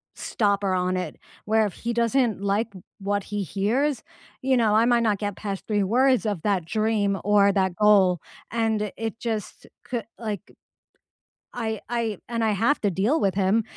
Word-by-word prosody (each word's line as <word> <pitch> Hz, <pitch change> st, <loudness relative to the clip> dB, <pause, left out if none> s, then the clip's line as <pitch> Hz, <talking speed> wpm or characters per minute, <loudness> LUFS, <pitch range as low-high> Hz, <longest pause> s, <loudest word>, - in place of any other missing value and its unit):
stopper 200 Hz, -3 st, 0 dB
on 185 Hz, 0 st, 0 dB
it, 180 Hz, -, -4 dB, 0.3 s
where 220 Hz, 0 st, +3 dB
if 195 Hz, -, -7 dB
he 235 Hz, 0 st, -4 dB
doesn't 235 Hz, -2 st, +1 dB
like 200 Hz, +3 st, 0 dB
w 185 Hz, -3 st, -12 dB, 0.2 s
what 200 Hz, 0 st, -1 dB
he 205 Hz, -1 st, -3 dB
hears, 225 Hz, -, 0 dB, 0.4 s
you 260 Hz, -1 st, +2 dB
know, 220 Hz, -3 st, +3 dB
I 225 Hz, +2 st, +5 dB
might 240 Hz, -1 st, +3 dB
not 210 Hz, -3 st, +1 dB
get 205 Hz, -2 st, -3 dB
past 200 Hz, -2 st, -5 dB
3 210 Hz, -2 st, +1 dB
words 250 Hz, +4 st, +3 dB
of 205 Hz, -6 st, -1 dB
that 195 Hz, -4 st, 0 dB
dream 210 Hz, 0 st, 0 dB
or 200 Hz, 0 st, +4 dB
that 190 Hz, -3 st, 0 dB
goal 200 Hz, -3 st, +5 dB, 0.3 s
and 220 Hz, -2 st, 0 dB
it 225 Hz, 0 st, -4 dB
just 220 Hz, -4 st, -4 dB, 0.2 s
cou 240 Hz, -2 st, -2 dB, 0.2 s
like 215 Hz, -5 st, -4 dB, 1.1 s
I 220 Hz, -3 st, -3 dB
I 230 Hz, -4 st, -1 dB
and 230 Hz, -1 st, -2 dB
I 220 Hz, -, +2 dB
have 290 Hz, +4 st, +2 dB
to 205 Hz, -, +2 dB
deal 215 Hz, -, +1 dB
with 195 Hz, -2 st, +1 dB
him, 200 Hz, +3 st, +2 dB
210 Hz, 180 wpm, -25 LUFS, 200-230 Hz, 1.1 s, I